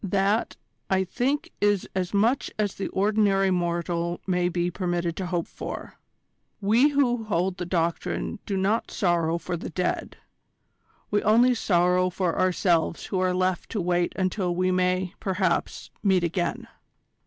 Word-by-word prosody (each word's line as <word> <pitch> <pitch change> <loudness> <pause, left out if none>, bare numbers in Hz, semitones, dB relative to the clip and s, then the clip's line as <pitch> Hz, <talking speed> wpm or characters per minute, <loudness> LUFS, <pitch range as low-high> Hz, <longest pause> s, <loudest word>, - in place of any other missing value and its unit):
That, 200 +3 0 0.3
I 190 0 +2
think 260 +9 -1
is 205 -2 +2
as 180 -2 -1
much 225 +6 +2
as 205 -2 0
the 195 - -4
ordinary 200 -1 +2
mortal 170 -1 -1
may 180 -1 +1
be 175 0 -1
permitted 175 -2 -2
to 185 - -3
hope 175 -2 -1
for. - - -7 0.6
We 225 +8 +4
who 245 -5 +1
hold 185 -2 0
the 180 -2 -4
Doctrine 170 +5 -1
do 195 - -1
not 205 +4 0
sorrow 170 -4 +1
for 175 - -4
the 165 - -6
dead: 180 +2 -2 0.9
we 205 - +2
only 235 +4 +5
sorrow 180 -4 +2
for 180 -1 -1
ourselves 175 -3 +1
who 190 - -2
are 185 -1 +1
left 185 -1 0
to 215 - -1
wait 175 -1 0
until 185 -1 -1
we 185 +1 +1
may, 185 0 +1
perhaps, 185 -3 -1
meet 190 -3 +3
again." 175 +1 -2
185 Hz, 150 wpm, -26 LUFS, 175-200 Hz, 0.9 s, only